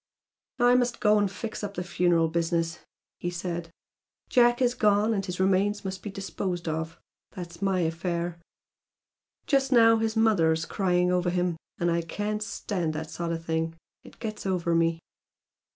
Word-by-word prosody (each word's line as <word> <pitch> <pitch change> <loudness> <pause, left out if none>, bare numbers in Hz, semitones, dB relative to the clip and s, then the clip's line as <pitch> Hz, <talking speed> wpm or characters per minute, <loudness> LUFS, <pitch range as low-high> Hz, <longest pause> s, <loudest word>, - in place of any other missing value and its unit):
"I 245 0 +5
must 245 -1 +2
go 210 -1 +4
and 205 -1 +2
fix 215 +3 -6
up 200 -1 -4
the 180 - -2
funeral 175 -2 +2
business" 165 0 -1 0.4
he 175 - -2
said, 175 -1 -4 0.6
"Jack 240 -1 +4
has 245 -2 +3
gone, 210 -1 +3
and 195 -2 -1
his 180 -2 -5
remains 195 +2 +2
must 190 0 -4
be 210 - -5
disposed 190 -3 -4
of. 160 +1 -3 0.3
That's 170 -2 -8
my 195 -2 +1
affair. 170 +1 -2 1.1
Just 275 -1 +2
now 230 -2 +6
his 225 0 -1
mother's 165 -8 +3
crying 180 -2 +1
over 180 0 +1
him, 175 -1 0 0.2
and 175 0 +1
I 170 0 +1
can't 210 +5 -3
stand 185 -6 -2
that 155 +1 -5
sort 170 -1 -3
of 165 0 -4
thing. 165 0 -1 0.3
It - - -15
gets 215 -3 -5
over 175 -3 0
me." 165 0 +2
180 Hz, 165 wpm, -27 LUFS, 170-210 Hz, 1.1 s, now